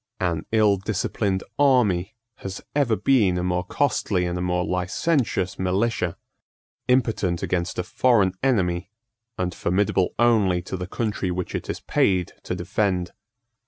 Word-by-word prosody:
An 85 -4 -1
ill 105 -3 +4
disciplined 100 0 -1 0.2
army 110 -8 +3 0.2
has 95 0 -6 0.2
ever 135 -6 +3
been 105 -4 +3
a 90 - -1
more 90 0 0
costly 95 -4 0
and 90 0 -2
a 90 - -2
more 90 0 0
licentious 95 - 0
militia, 95 -1 0 0.7
impotent 115 -9 +1
against 90 -1 -1
a 90 - 0
foreign 100 -1 +2
enemy, 95 -8 +1 0.5
and 90 -1 -2
formidable 95 0 0
only 105 -6 +3
to 95 - -5
the 90 -1 -5
country 105 -2 -2
which 90 0 -3
it - - -4
is - - -4
paid 90 -3 +1
to - - -4
defend. 90 -1 -1
95 Hz, 140 wpm, -24 LUFS, 90-110 Hz, 0.7 s, ill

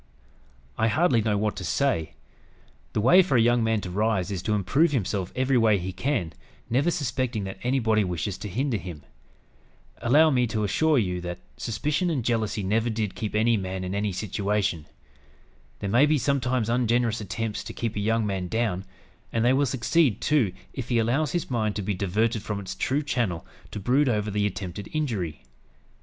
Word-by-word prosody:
I 110 - +3
hardly 130 -1 +3
know 105 -1 +1
what 105 +1 0
to 95 - -5
say. 105 - 0 0.8
The 105 - +1
way 175 - +7
for 175 -8 +2
a - - +5
young 120 +1 +3
man 110 -1 +1
to 90 - -6
rise 105 -1 0
is 95 -3 -3
to 105 +3 0
improve 130 - +2
himself 100 -6 -1
every 130 0 +2
way 110 -2 +4
he 95 0 -4
can, 100 - -1 0.4
never 135 +8 +3
suspecting 125 -7 -1
that 95 0 -6
anybody 115 -4 +2
wishes 90 +1 -2
to 105 - -5
hinder 125 +4 -1
him. 85 -5 -8 1.0
Allow 155 +6 +5
me 125 -3 +2
to 110 -1 -1
assure 155 +9 +2
you 90 -6 0
that 90 0 -5 0.2
suspicion 150 - -1
and 135 -9 -1
jealousy 110 -3 0
never 110 +5 +1
did 110 -3 -2
keep 105 -2 -4
any 115 +1 +3
man 95 -1 -4
in 90 +1 -3
any 100 0 -1
situation. 100 -3 -1 0.9
There 100 - -2
may 130 +6 +5
be 155 0 +3
sometimes 130 -3 0
ungenerous 120 -1 +1
attempts 105 +2 -3
to 110 - -6
keep 115 -2 -3
a - - -1
young 110 +2 +1
man 95 -3 -2
down; 100 -3 -1 0.5
and 115 0 +1
they 125 - +5
will 140 +1 +2
succeed, 130 - +2
too, 120 -5 +2 0.2
if 130 -3 -6
he 120 - +2
allows 130 +6 +1
his 175 -6 -2
mind 110 -4 0
to 105 - -2
be 105 +2 -1
diverted 105 +4 0
from 105 0 -4
its 95 -2 -6
true 135 +9 -1
channel 120 - -1 0.2
to - - -6
brood 130 +7 +2
over 105 -2 0
the 105 0 +1
attempted 95 0 -6
injury. 105 - -2
110 Hz, 190 wpm, -26 LUFS, 100-125 Hz, 1.0 s, way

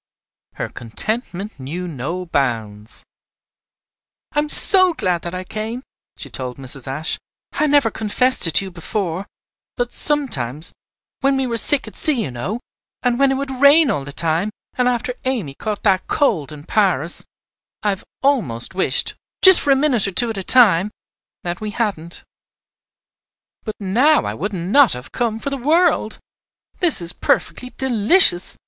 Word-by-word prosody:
Her - - -4
contentment 195 - -5
knew 165 +8 -5
no 170 +5 -5
bounds. 115 -8 -3 1.3
"I 295 - 0
am 300 0 -1
so 370 +1 +6
glad 180 - -1
that 175 +1 -6
I 185 - -4
came," 220 +6 -5 0.3
she - - -5
told 125 -1 -6
Mrs. 135 -1 -7
Ashe. 150 +5 -2 0.3
"I 305 - 0
never 285 -6 +3
confessed 225 0 +2
it 165 - -2
to 195 - +4
you 190 - -8
before; 180 +1 -4 0.5
but 245 -1 -2
sometimes. 155 - 0 0.5
when 275 0 +1
we 265 - 0
were 235 -2 -2
sick 285 +4 +2
at - - -11
sea, 275 -8 0
you 135 - -5
know, 155 - -4 0.4
and 245 0 +1
when 275 -1 +4
it - - +1
would 270 -1 -5
rain 285 -1 +6
all 145 - -2
the 140 - -8
time, 165 +6 -1 0.3
and 250 -1 +1
after 250 0 -1
Amy 230 - -2
caught 210 +8 -5
that 190 -3 +2
cold 175 - 0
in 150 -1 -10
Paris 175 -5 0 0.6
I 210 - +1
have 195 -2 -3 0.2
almost 200 - +1
wished, 190 - +1 0.3
just 375 -2 +9
for - - -2
a 275 - +6
minute 265 -7 +2
or - - -3
two 230 +5 +1
at 220 - -6
a - - -3
time, 200 -4 +4 0.5
that 175 +2 -4
we 215 - -3
hadn't. 200 -7 -4 1.4
But 215 - -4
now 245 +11 +2
I - - -3
wouldn't 190 -4 -4
not 280 -1 +6
have 125 +1 -9
come 230 -3 -1
for 280 +5 -5
the 275 - -2
world! 310 -3 +1 0.6
This 345 - +2
is 170 +1 -1
perfectly 250 - -1
delicious. 235 - +4
210 Hz, 165 wpm, -19 LUFS, 170-260 Hz, 1.4 s, just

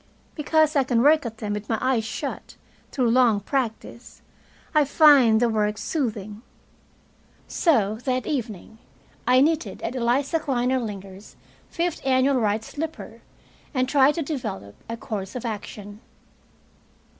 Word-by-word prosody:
Because 310 0 +1
I 275 - +4
can 245 -2 +1
work 300 -2 +4
at 225 -1 -9
them 210 -2 -4
with 210 0 -6
my 225 - +1
eyes 255 -4 +1
shut, - - -6 0.4
through 245 -4 +1
long 240 -4 +4
practise, 235 0 -4 0.5
I 305 -1 +5
find 275 -6 +5
the 240 - +3
work 210 -2 0
soothing. 215 -9 -3 1.1
So 220 - +1
that 255 -2 -1
evening 220 - -5 0.5
I 255 +1 +5
knitted 300 -10 0
at 230 - -3
Eliza 260 +6 +1
Klinordlinger's 230 -8 -3 0.3
fifth 340 -1 -2
annual 265 +1 +2
right 215 -2 0
slipper, 315 +6 -7 0.5
and 255 0 +1
tried 280 +1 +4
to 330 - -2
develop 170 - -5 0.2
a 230 - -4
course 205 -3 -6
of 250 - -5
action. 210 -1 -7
245 Hz, 135 wpm, -24 LUFS, 215-280 Hz, 1.1 s, I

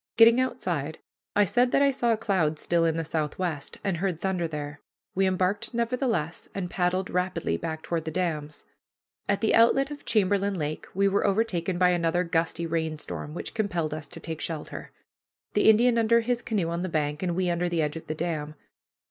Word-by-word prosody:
Getting 230 +2 +7
outside, 160 - -2 0.4
I 205 - +5
said 245 +6 +2
that 280 - +4
I 280 - +5
saw 240 -3 +1
clouds 185 -9 0
still 170 -1 +2
in 165 0 +1
the 165 - -1
southwest, 155 0 -3
and 190 -4 0
heard 180 -2 -1
thunder 185 -3 -1
there. 145 -2 -6 0.3
We 190 0 +2
embarked, 190 +5 0
nevertheless, 235 - -1
and 180 -3 -3
paddled 185 +1 0
rapidly 180 -2 0
back 160 -1 -4
toward 165 -2 -2
the - - -2
dams. 155 -4 -3 0.6
At 200 0 +1
the 220 - +2
outlet 270 +5 +4
of 290 - -8
Chamberlain 200 -2 +2
Lake 155 -2 -3
we 200 +1 +3
were 200 +1 +2
overtaken 190 -4 0
by 180 0 +4
another 175 0 +1
gusty 165 0 0
rainstorm, 160 -2 -3
which - - -5
compelled 175 -8 -1
us 155 -1 -5
to - - -9
take 160 -2 -6
shelter, 160 -3 -5 0.6
the - - +5
Indian 235 +2 +5
under 230 +1 +4
his 240 +1 -1
canoe 200 -7 -1
on 170 +1 -2
the 185 - -2
bank, 150 -2 -1
and 175 -2 -1
we 180 -1 +1
under 175 +1 0
the 170 -2 +1
edge 150 +1 -2
of 160 - -8
the 155 - -3
dam. 155 -2 -3
180 Hz, 190 wpm, -27 LUFS, 160-205 Hz, 0.6 s, Getting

